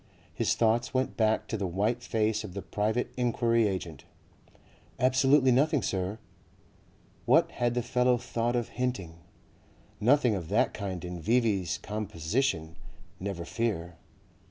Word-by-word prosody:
His -, -, +1 dB
thoughts 120 Hz, +3 st, +1 dB
went 130 Hz, +1 st, 0 dB
back 110 Hz, -1 st, +1 dB
to 110 Hz, -, -2 dB
the 100 Hz, -2 st, -2 dB
white 105 Hz, +7 st, 0 dB
face 110 Hz, -2 st, 0 dB
of 100 Hz, -3 st, -9 dB
the 100 Hz, -, -4 dB
private 110 Hz, +4 st, -1 dB
enquiry 115 Hz, -2 st, +2 dB
agent. 90 Hz, -6 st, -4 dB, 1.0 s
"Absolutely 130 Hz, +1 st, +4 dB
nothing, 145 Hz, +3 st, +3 dB
Sir." 95 Hz, +2 st, -2 dB, 1.1 s
What -, -, +4 dB
had 120 Hz, 0 st, -1 dB
the 120 Hz, -, 0 dB
fellow 125 Hz, +1 st, +2 dB
thought 120 Hz, 0 st, -2 dB
of 120 Hz, -1 st, -1 dB
hinting? 110 Hz, -10 st, -3 dB, 0.8 s
Nothing 125 Hz, +1 st, +4 dB
of 85 Hz, -5 st, -4 dB
that -, -, +2 dB
kind 95 Hz, -3 st, -5 dB
in 90 Hz, -1 st, -6 dB
V.V.'s 105 Hz, -3 st, +1 dB
composition, 90 Hz, -, -2 dB, 0.4 s
never 95 Hz, -3 st, -4 dB
fear. 90 Hz, -8 st, -2 dB
110 Hz, 130 wpm, -29 LUFS, 95-125 Hz, 1.1 s, Absolutely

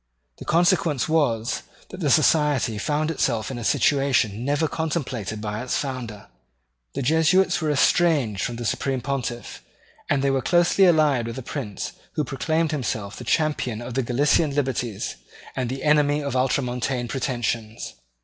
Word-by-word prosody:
The -, -, -8 dB
consequence 170 Hz, -4 st, +2 dB
was, 125 Hz, -8 st, +1 dB, 0.3 s
that 185 Hz, -, -9 dB
the 155 Hz, -6 st, 0 dB
Society 145 Hz, -7 st, +3 dB
found 150 Hz, +7 st, 0 dB
itself 115 Hz, -7 st, -1 dB
in 125 Hz, -, -5 dB
a -, -, -6 dB
situation 125 Hz, -5 st, +2 dB
never 145 Hz, +4 st, +1 dB
contemplated 130 Hz, -, -3 dB
by 105 Hz, 0 st, -4 dB
its 125 Hz, -, -1 dB
founder. 120 Hz, -7 st, -5 dB, 0.7 s
The -, -, -2 dB
Jesuits 160 Hz, +7 st, +3 dB
were 155 Hz, -, 0 dB
estranged 140 Hz, -, +2 dB
from 120 Hz, -, -2 dB
the 120 Hz, 0 st, -5 dB
Supreme 130 Hz, +3 st, -1 dB
Pontiff; 130 Hz, -3 st, -4 dB, 0.5 s
and 140 Hz, -2 st, +1 dB
they 140 Hz, -, +2 dB
were 135 Hz, -1 st, +1 dB
closely 175 Hz, +4 st, +4 dB
allied 150 Hz, -8 st, +3 dB
with 115 Hz, -, -6 dB
a 130 Hz, -, -6 dB
prince 115 Hz, -7 st, -5 dB, 0.2 s
who 150 Hz, -, 0 dB
proclaimed 155 Hz, +5 st, -1 dB
himself 110 Hz, -8 st, -3 dB
the -, -, -7 dB
champion 150 Hz, -8 st, 0 dB
of 120 Hz, +1 st, -7 dB
the 135 Hz, -, +1 dB
Gallican 140 Hz, +4 st, +2 dB
liberties 125 Hz, -7 st, -2 dB, 0.4 s
and 125 Hz, -2 st, -2 dB
the 130 Hz, +1 st, -5 dB
enemy 150 Hz, -1 st, +3 dB
of 140 Hz, -2 st, -3 dB
Ultramontane 125 Hz, -1 st, 0 dB
pretensions. 120 Hz, -3 st, -3 dB
135 Hz, 155 wpm, -24 LUFS, 120-150 Hz, 0.7 s, closely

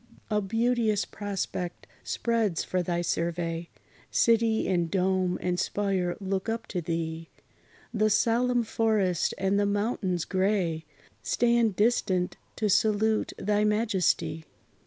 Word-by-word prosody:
A 210 Hz, 0 st, +2 dB
beauteous 225 Hz, 0 st, +1 dB
prospect 195 Hz, -3 st, -4 dB, 0.2 s
spreads 225 Hz, -7 st, 0 dB
for 185 Hz, -, -1 dB
thy 175 Hz, 0 st, -1 dB
survey; 170 Hz, 0 st, -2 dB, 0.4 s
City 230 Hz, -1 st, +3 dB
and 175 Hz, -3 st, +1 dB
dome, 185 Hz, 0 st, +1 dB
and 180 Hz, 0 st, 0 dB
spire 190 Hz, -3 st, -1 dB
look 195 Hz, +1 st, -2 dB
up 225 Hz, 0 st, -2 dB
to 180 Hz, -, -2 dB
thee: 165 Hz, 0 st, -3 dB, 0.6 s
The 215 Hz, -1 st, +2 dB
solemn 240 Hz, +3 st, +2 dB
forest 215 Hz, -5 st, +1 dB
and 195 Hz, +1 st, +1 dB
the 205 Hz, -, +2 dB
mountains 200 Hz, -4 st, -1 dB
gray 185 Hz, -4 st, 0 dB, 0.4 s
Stand 235 Hz, -4 st, +2 dB
distant 190 Hz, -5 st, +1 dB, 0.2 s
to 215 Hz, -, 0 dB
salute 215 Hz, +2 st, +2 dB
thy 210 Hz, +1 st, +1 dB
majesty. 210 Hz, -7 st, +1 dB
200 Hz, 115 wpm, -28 LUFS, 180-220 Hz, 0.6 s, City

